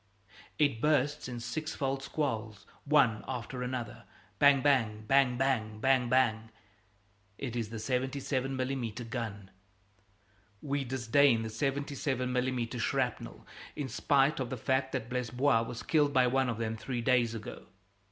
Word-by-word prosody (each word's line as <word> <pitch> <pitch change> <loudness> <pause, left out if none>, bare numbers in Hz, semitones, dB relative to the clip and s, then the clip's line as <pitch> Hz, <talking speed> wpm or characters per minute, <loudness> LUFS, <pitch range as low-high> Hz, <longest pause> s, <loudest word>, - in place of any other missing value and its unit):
It 145 -7 +2
bursts 145 -1 +1
in 120 -2 -5
sixfold 135 0 -3
squalls, 110 -8 -3 0.2
one 140 -7 +3
after 125 0 -5
another 125 -3 -5 0.3
bang, 140 -2 +6
bang, 115 -7 +2
bang, 135 -1 +4
bang, 120 -5 0
bang, 130 0 +2
bang. 115 -4 +2 0.9
It 125 -4 -5
is 115 -3 -2
the 115 - -6
77 130 +2 -2
mm. 125 -3 -3
gun. 105 -6 -5 1.1
We 140 +2 -2
disdain 130 -1 +3
the 110 - -5
77 135 0 -2
mm. 125 -2 -1
shrapnel, 130 0 -2 0.3
in 140 -3 -4
spite 140 +5 +2
of 130 -2 -2
the 130 - -4
fact 130 +3 0
that 125 -4 -2
Blesbois 125 +1 +1
was 115 +1 -6
killed 145 -3 +2
by 130 -2 +5
one 130 +1 +2
of 115 - -2
them 110 -1 -2
three 120 +1 -4
days 120 -2 +2
ago. 110 - -8
125 Hz, 140 wpm, -31 LUFS, 115-135 Hz, 1.1 s, bang